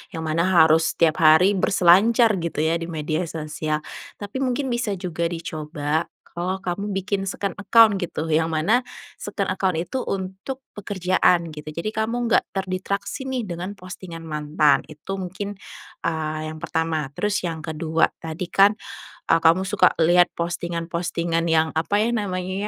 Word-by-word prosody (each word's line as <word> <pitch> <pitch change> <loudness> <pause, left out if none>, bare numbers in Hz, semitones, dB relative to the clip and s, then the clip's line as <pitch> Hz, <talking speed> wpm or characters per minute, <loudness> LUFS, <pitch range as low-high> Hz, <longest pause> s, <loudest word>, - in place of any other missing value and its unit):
yang 160 - -4
mana 160 +3 +1
harus 160 -2 +4
setiap 165 -2 +2
hari 160 +5 +6
berselancar 195 +4 +4
gitu 165 -3 -2
ya 165 +1 +1
di 165 - -5
media 160 +1 -2
sosial. 155 -1 -3 0.4
Tapi 205 +5 -5
mungkin 265 0 -1
bisa 235 -4 -1
juga 170 -2 -2
dicoba 155 -2 -3 0.3
kalau 185 +2 -2
kamu 195 +2 -3
bikin 195 0 -2
second 200 -1 -3
account 215 +1 +5
gitu 165 -3 -3
yang 160 +1 +1
mana 205 +11 +2 0.3
second 200 -1 -3
account 185 -3 0
itu 180 +10 -3
untuk 190 +7 -4 0.2
pekerjaan 185 -3 +1
gitu, 150 0 -8
jadi 170 +8 -4
kamu 220 +2 -1
nggak 230 - +4
terdistraksi 195 +6 -3
nih 260 -4 -3
dengan 175 +2 -5
postingan 185 -3 -9
mantan 150 -2 +2
itu 155 +6 -6
mungkin, 195 +2 -5 0.5
eee, 155 -1 -2
yang 155 - -9
pertama. 160 -3 -1
Terus 210 0 0
yang 165 -3 -4
kedua 160 0 0
tadi 160 +2 -5
kan 200 +2 +5 0.5
e - - +2
kamu 165 +3 +5
suka 185 -1 +4
lihat 175 +2 +5
postingan-postingan 170 0 -2
yang 160 0 +3
apa 165 +6 +1
ya 230 - +1
namanya 185 -4 -2
175 Hz, 150 wpm, -23 LUFS, 160-200 Hz, 0.5 s, hari